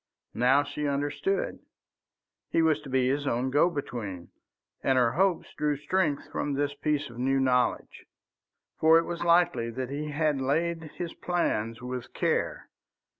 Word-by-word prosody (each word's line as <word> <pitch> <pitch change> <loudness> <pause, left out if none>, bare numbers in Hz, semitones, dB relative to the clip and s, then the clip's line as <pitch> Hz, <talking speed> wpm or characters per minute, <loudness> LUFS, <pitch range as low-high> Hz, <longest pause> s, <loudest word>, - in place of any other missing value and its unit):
Now 130 +4 +4
she 150 +1 -3
understood: 145 - -1 0.9
he 165 - +2
was 160 -2 +2
to 140 - -10
be 130 -1 +2
his 140 +2 0
own 130 +1 0
go 145 +5 +4
between, 110 - -5 0.5
and 135 -1 +3
her 120 -2 +4
hopes 185 +1 +1
drew 150 -1 0
strength 155 -1 0
from 145 - -2
this 145 +1 0
piece 145 -3 -1
of 120 - -10
new 135 +2 +2
knowledge. 125 -1 0 0.7
For 160 +1 +6
it 165 - +2
was 175 0 -4
likely 170 -9 +3
that 130 +2 -5
he 150 +2 -3
had 150 -2 0
laid 165 +5 0
his 170 -2 -5
plans 115 -10 -1
with 125 -1 -6
care. - - -1
145 Hz, 155 wpm, -28 LUFS, 130-165 Hz, 0.9 s, For